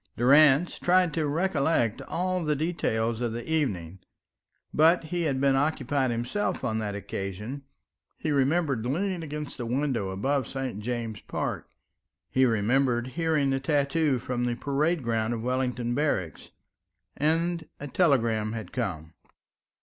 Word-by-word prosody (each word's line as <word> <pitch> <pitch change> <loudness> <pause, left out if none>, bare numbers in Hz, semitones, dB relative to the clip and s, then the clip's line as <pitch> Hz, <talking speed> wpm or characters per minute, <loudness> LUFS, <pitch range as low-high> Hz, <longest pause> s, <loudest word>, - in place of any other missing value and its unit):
Durrance 145 +5 +5
tried 180 -2 +3
to 155 -1 0
recollect 150 - +1
all 185 0 -1
the 150 -1 +1
details 120 -8 -1
of 120 -2 -1
the 120 +1 -6
evening; 95 - -1 0.7
but 165 +3 +5
he 175 +2 -3
had 135 -4 0
been 135 0 +3
occupied 140 -2 +1
himself 120 - -2
on 110 -3 0
that 105 -2 -3
occasion. 100 +7 -5 0.5
He 155 - -2
remembered 140 -2 +1
leaning 175 +8 -1
against 150 -3 -6
the 120 - -3
window 125 -5 0
above 130 +9 -1
St. 135 -6 -4
James's 115 -2 -4
Park; - - -3 0.6
he 130 0 +4
remembered 120 +3 +1
hearing 155 -2 +1
the 135 - +1
tattoo 145 +1 +1
from 120 0 -2
the 120 -1 0
parade 145 +4 0
ground 115 0 0
of 115 - -5
Wellington 125 -1 -1
Barracks 110 - -1 0.7
and 165 +3 0
a 145 - -5
telegram 115 -9 +2
had 115 -2 -6
come. 85 -10 -4
135 Hz, 140 wpm, -27 LUFS, 115-155 Hz, 0.7 s, Durrance